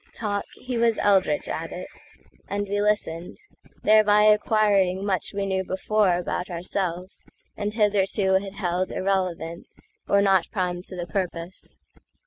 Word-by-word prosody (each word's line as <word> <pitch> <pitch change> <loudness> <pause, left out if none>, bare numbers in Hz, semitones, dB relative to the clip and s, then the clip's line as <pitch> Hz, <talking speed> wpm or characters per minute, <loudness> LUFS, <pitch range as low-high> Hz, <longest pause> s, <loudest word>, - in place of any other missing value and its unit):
Talk? 205 -2 -2
He 250 -2 -4
was 230 -1 +3
eldritch 200 +8 +2
at - - -4
it; - - -6 0.6
and 205 0 -2
we 205 +1 -1
listened—Thereby 210 - +1
acquiring 210 -3 +3
much 190 -5 -1
we 200 -1 -2
knew 190 -1 -1
beforeAbout 185 -2 0
ourselves, 180 +1 -4 0.3
and 205 0 -2
hitherto 200 -2 +2
had 195 -1 -8
heldIrrelevant, 185 -2 -2 0.3
or 200 - +4
not 195 -3 +3
prime 180 -3 -2
to 185 - -9
the 175 -1 -4
purpose. 175 0 -4
195 Hz, 120 wpm, -25 LUFS, 180-210 Hz, 0.6 s, or